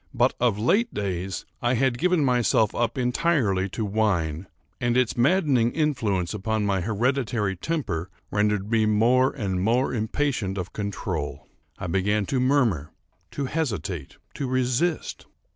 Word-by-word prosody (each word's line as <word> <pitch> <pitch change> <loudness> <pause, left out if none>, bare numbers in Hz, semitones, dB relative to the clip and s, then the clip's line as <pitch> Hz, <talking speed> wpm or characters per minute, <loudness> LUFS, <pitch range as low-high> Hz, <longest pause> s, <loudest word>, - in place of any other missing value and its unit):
But, 120 +2 +3
of 120 -4 +2
late 195 - +2
days, 95 -2 -3 0.2
I 120 +1 +2
had 125 -1 +1
given 180 -4 +2
myself 120 -4 +2
up 120 +2 -1
entirely 125 - +1
to 110 +3 -3
wine; 95 -6 0 0.3
and 120 0 +1
its 125 -3 +2
maddening 130 -3 +3
influence 115 - 0
upon 105 +1 -1
my 100 -2 +1
hereditary 110 -1 0
temper 90 - -3 0.2
rendered 105 0 0
me 110 -2 +3
more 120 +5 +4
and 95 -7 -2
more 120 +7 +1
impatient 110 -3 -1
of 90 -1 -5
control. 95 -7 -4 0.3
I - - -6
began 100 +4 +1
to 130 - -1
murmur,—to 105 - -1
hesitate,—to 105 - -4
resist. 130 +6 -1
110 Hz, 130 wpm, -25 LUFS, 95-130 Hz, 0.3 s, more